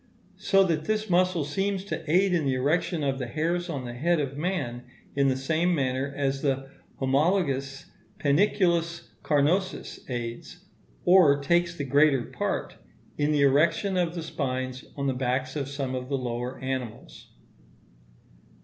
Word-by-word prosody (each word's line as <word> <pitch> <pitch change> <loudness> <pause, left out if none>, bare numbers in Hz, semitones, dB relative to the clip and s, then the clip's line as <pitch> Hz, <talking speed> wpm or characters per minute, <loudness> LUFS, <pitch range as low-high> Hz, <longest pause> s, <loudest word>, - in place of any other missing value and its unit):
So 195 -1 +4
that 160 -4 0
this 215 -2 -1
muscle 180 -3 +2
seems 195 +5 -2
to 200 - -4
aid 185 +2 +4
in 170 -3 +2
the 135 -1 +1
erection 155 +5 0
of 135 -1 0
the 125 - -3
hairs 170 +6 -1
on 135 -6 -4
the 120 - -6
head 165 +7 +1
of 140 -2 -2
man 145 -7 -2 0.3
in 140 0 +3
the 130 -1 +1
same 160 +6 +1
manner 135 -1 -1
as 135 -1 0
the 135 -1 -1 0.3
homologous 140 -1 0 0.3
panniculus 170 +1 +1
carnosus 165 +6 0
aids, 120 -2 -6 0.4
or 175 -6 +6
takes 170 +4 +1
the 145 - -4
greater 140 -1 +4
part, - - -3 0.4
in 145 +1 +2
the 150 -1 +2
erection 160 +8 +3
of 175 -1 0
the 170 - -4
spines 130 -4 -3
on 140 - -2
the 135 - +1
backs 130 +1 -1
of 140 -2 -3
some 140 -2 -3
of 125 0 -4
the 140 - 0
lower 125 0 -4
animals. 130 -3 -6
145 Hz, 155 wpm, -27 LUFS, 130-175 Hz, 0.4 s, or